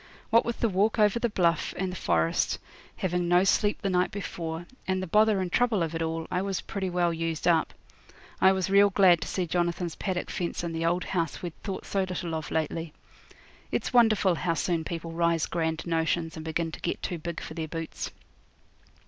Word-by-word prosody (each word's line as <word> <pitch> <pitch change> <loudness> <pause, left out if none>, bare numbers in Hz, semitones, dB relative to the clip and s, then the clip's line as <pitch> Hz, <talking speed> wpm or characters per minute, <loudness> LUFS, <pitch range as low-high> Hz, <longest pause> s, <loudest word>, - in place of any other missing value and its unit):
What 230 +1 +5
with 235 - -3
the 230 - +4
walk 210 +3 +1
over 210 +1 +4
the 240 - +1
bluff 170 -6 +1
and 190 -1 -1
the - - -6
forest, 85 - +1 0.4
having 180 -1 0
no 175 +1 +5
sleep 205 +2 +2
the 195 - +1
night 180 0 +2
before, 170 -4 -5 0.2
and 185 0 +1
the 185 - -3
bother 210 +3 +4
and 180 -2 -3
trouble 235 -5 +2
of 165 0 -3
it 165 - -2
all, 165 0 -2
I 180 - +1
was 195 -1 -2
pretty 195 -3 -3
well 175 -1 +1
used 165 0 -2
up. 165 -3 +3 0.7
I 190 - +7
was 190 -2 0
real 200 +1 +6
glad 185 -4 +5
to - - -4
see 185 - -1
Jonathan's 175 0 -1
paddock 185 -3 -3
fence 175 -1 -3
and 170 -1 -3
the 165 0 0
old 175 +2 +1
house 165 -4 -2
we'd 175 -2 -4
thought 195 -3 -5
so 195 - 0
little 180 -2 -3
of 160 -1 -3
lately. 160 0 -2 0.8
It's - - -2
wonderful 220 -6 +5
how 165 +1 -1
soon 165 -1 0
people 165 0 -5
rise 170 -1 +1
grand 160 -1 -2
notions 165 0 0
and 160 - -7
begin 160 +1 -2
to - - -9
get 175 - -3
too 175 -3 -3
big 170 +1 -5
for - - -7
their 160 -1 -4
boots. 165 0 -5
175 Hz, 210 wpm, -28 LUFS, 165-190 Hz, 0.8 s, I